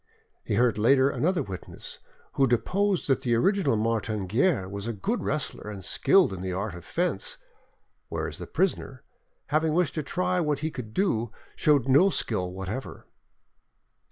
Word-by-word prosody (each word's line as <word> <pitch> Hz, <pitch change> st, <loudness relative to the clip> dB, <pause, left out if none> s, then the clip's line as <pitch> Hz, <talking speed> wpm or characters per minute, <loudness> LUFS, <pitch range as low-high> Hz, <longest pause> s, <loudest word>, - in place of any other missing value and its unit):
He -, -, -1 dB
heard 120 Hz, -1 st, +2 dB
later 130 Hz, +4 st, +4 dB
another 175 Hz, +5 st, 0 dB
witness 95 Hz, -3 st, -8 dB, 0.3 s
who 135 Hz, -, +3 dB
deposed 190 Hz, -, +1 dB
that 135 Hz, -, +2 dB
the 120 Hz, -2 st, +1 dB
original 185 Hz, -, +2 dB
Martin 110 Hz, -2 st, -1 dB
Guerre 115 Hz, -, +1 dB
was 100 Hz, +2 st, -5 dB
a 115 Hz, -, -2 dB
good 100 Hz, -, -2 dB
wrestler -, -, -3 dB
and 100 Hz, -3 st, -6 dB
skilled 190 Hz, -, +4 dB
in 90 Hz, -, -6 dB
the 95 Hz, -1 st, -3 dB
art 100 Hz, +2 st, -3 dB
of 85 Hz, -, -9 dB
fence, -, -, -2 dB, 0.7 s
whereas -, -, -3 dB
the -, -, -6 dB
prisoner, -, -, -1 dB, 0.5 s
having 155 Hz, 0 st, +2 dB
wished 175 Hz, -4 st, +2 dB
to 155 Hz, -, -2 dB
try 180 Hz, +4 st, -1 dB
what 150 Hz, -4 st, +1 dB
he 160 Hz, -, -1 dB
could 110 Hz, -6 st, -8 dB
do, 120 Hz, -, +1 dB, 0.2 s
showed 145 Hz, -4 st, +3 dB
no 145 Hz, +9 st, +6 dB
skill 95 Hz, -, 0 dB
whatever. 95 Hz, +8 st, -6 dB
125 Hz, 160 wpm, -27 LUFS, 105-170 Hz, 0.7 s, no